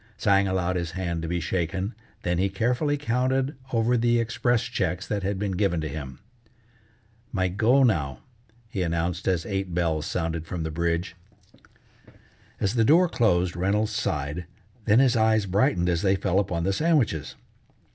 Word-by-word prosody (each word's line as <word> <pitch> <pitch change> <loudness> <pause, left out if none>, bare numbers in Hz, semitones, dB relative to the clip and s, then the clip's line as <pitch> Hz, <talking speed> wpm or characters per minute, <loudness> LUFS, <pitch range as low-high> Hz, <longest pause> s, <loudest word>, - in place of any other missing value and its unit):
Tsang 100 0 +3
allowed 90 -1 0
his 85 -1 -3
hand 85 -3 -3
to 80 - -4
be 85 +1 -1
shaken, 90 +4 -2 0.3
then 90 0 0
he 100 +1 +2
carefully 125 +9 0
counted 130 +2 0 0.2
over 115 +1 +2
the 120 0 +2
express 115 +1 +1
checks 90 +3 -2
that 105 -1 -2
had 100 +1 -2
been 100 0 -2
given 95 -2 0
to 80 - -3
him. 70 -3 -7 1.1
"My 95 -3 0
go 115 +8 +3
now," 75 - 0 0.4
he 105 -4 -4
announced 85 +1 -1
as 90 -3 +1
eight 95 -3 -3
bells 80 -3 0
sounded 80 -2 -3
from 85 -3 -4
the 80 - -3
bridge. 85 +2 -1 1.4
As 100 - 0
the 115 -2 +3
door 170 +10 +5
closed 90 - +1
Reynolds 100 +5 0
sighed, 75 -3 -2 0.4
then 105 0 +4
his 130 -1 +4
eyes 110 -2 +3
brightened 95 -2 +1
as 85 -1 +1
they 95 -1 +3
fell 95 -1 +1
upon 90 -4 -1
the 95 +2 +1
sandwiches. 140 - +1
95 Hz, 165 wpm, -25 LUFS, 85-110 Hz, 1.4 s, door